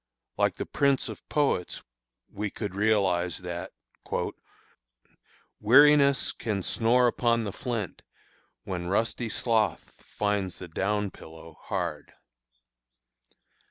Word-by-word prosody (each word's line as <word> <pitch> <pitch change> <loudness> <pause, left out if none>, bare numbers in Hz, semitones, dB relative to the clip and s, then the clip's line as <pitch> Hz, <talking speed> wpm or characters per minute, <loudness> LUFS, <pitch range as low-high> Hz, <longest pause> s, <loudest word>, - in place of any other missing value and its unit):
Like - - +1
the - - -4
prince 140 -2 +1
of - - -10
poets, 140 - 0 0.4
we 105 +1 -4
could 100 0 -5
realize 95 -5 +1
that 90 -1 -6 1.9
Weariness 140 +4 +6
Can 105 -5 -3
snore 120 +5 +3
upon 115 -1 +2
the 100 -3 -4
flint, 115 -6 -4 0.6
when 90 -2 -4
rusty 115 +4 0
sloth 110 0 0
Finds 100 -3 -2
the 90 - -8
down 100 +4 -1
pillow 80 0 -13
hard. - - -4
105 Hz, 100 wpm, -27 LUFS, 95-120 Hz, 1.9 s, Weariness